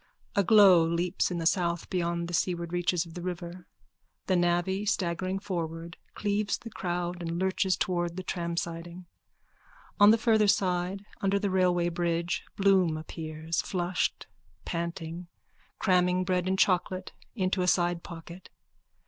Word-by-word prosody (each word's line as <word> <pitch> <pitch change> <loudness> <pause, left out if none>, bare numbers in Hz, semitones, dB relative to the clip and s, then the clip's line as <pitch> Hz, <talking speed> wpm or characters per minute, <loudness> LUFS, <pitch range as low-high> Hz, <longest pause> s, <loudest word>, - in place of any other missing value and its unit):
A 200 - +4
glow 195 -3 +7
leaps 170 +2 0
in 180 - -3
the 165 - -3
south 170 -1 +1
beyond 170 -2 -1
the 175 - -7
seaward 170 -1 -1
reaches 175 -1 +1
of 165 - -12
the 175 - -7
river. 175 0 -6 0.6
The 185 - +1
navvy, 175 +3 +1
staggering 185 -2 -1
forward, 170 -4 -4 0.2
cleaves 205 0 0
the 230 -1 -10
crowd 175 -2 -3
and 170 0 -3
lurches 190 0 +1
towards 175 -2 -1
the 185 - -5
tramsiding. 170 0 -4 0.9
On 205 0 +8
the 225 - +6
farther 220 -2 +3
side 185 0 0 0.2
under 195 0 +2
the 200 -1 -1
railway 180 -2 +2
bridge 170 0 -1
Bloom 190 -5 +3
appears, 160 0 -4
flushed, 180 -1 -2 0.4
panting, 170 0 -4 0.5
cramming 180 0 +2
bread 180 -1 0
and 190 0 +1
chocolate 185 0 +1 0.2
into 185 -3 0
a 180 - 0
sidepocket. 175 0 -2
175 Hz, 140 wpm, -28 LUFS, 170-190 Hz, 0.9 s, On